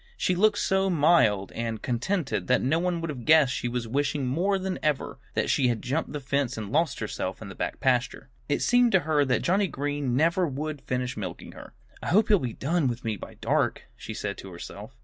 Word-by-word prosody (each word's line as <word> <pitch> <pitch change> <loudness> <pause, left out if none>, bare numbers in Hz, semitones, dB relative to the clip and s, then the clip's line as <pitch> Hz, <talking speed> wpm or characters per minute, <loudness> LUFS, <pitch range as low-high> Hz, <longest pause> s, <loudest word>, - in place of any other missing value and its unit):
She 185 - +1
looked 205 +3 +3
so 190 0 +1
mild 145 - +3
and 115 -1 -3
contented 135 +6 -1
that 125 - +3
no 150 +6 +2
one 175 -1 -1
would 165 -2 -3
have 125 -5 -7
guessed 155 -3 +5
she - - -2
was 120 -1 -3
wishing 140 +3 0
more 175 +10 +1
than 190 0 -3
ever 150 -3 -1 0.2
that - - +1
she 130 - +3
had 120 -3 -1
jumped 145 +6 -2
the 150 - -4
fence 135 -2 -1
and 105 -2 -5
lost 160 0 +1
herself 95 -3 -4
in 105 - -8
the - - -8
back - - -4
pasture. 130 0 0 0.2
It 145 - +1
seemed 245 -1 +4
to 190 - +5
her 150 -2 +2
that 125 -1 +1
Johnnie 195 +3 +2
Green 145 -4 -2
never 170 +5 +2
would 150 +1 -4
finish 125 0 -2
milking - - -6
her. - - -12 0.3
"I - - -6
hope 210 +4 +3
he'll 205 -3 +5
be 125 -4 -3
done 160 +1 0
with 120 0 -3
me 110 -1 0
by - - -10
dark," - - 0
she 110 - -8
said 100 -1 -4
to 95 - -9
herself. 85 - -9
140 Hz, 225 wpm, -27 LUFS, 125-170 Hz, 0.3 s, guessed